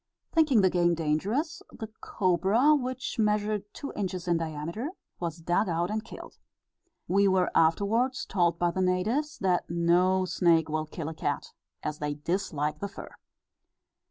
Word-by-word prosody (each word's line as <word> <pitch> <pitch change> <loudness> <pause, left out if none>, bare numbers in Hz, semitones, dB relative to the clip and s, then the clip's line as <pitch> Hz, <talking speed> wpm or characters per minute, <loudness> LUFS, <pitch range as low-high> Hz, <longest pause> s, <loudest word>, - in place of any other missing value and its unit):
Thinking 310 -9 +4
the 185 -1 +4
game 175 -1 +3
dangerous, 195 - -1
the 225 - -7 0.2
cobra, 195 - +3
which 255 -4 -2
measured 210 -1 0
two 280 - -7
inches 185 -3 -3
in 170 -1 +3
diameter, 165 - -4 0.3
was 170 -2 -3
dug 175 +4 0
out 170 +3 0
and 215 0 -2
killed. 225 - -11 0.7
We 200 +3 +3
were 185 -1 +2
afterwards 220 +11 +2
told 175 -3 +1
by 175 0 +1
the 190 - -2
natives, 220 +12 0
that 185 -2 +1
no 180 +2 +3
snake 165 -3 +2
will 155 0 -2
kill 155 0 -6
a 160 - -4
cat, 145 -2 -3 0.3
as 150 0 -3
they 150 -1 -2
dislike 150 -2 -2
the 200 - -3
fur." 200 - -10
185 Hz, 155 wpm, -28 LUFS, 165-215 Hz, 0.7 s, Thinking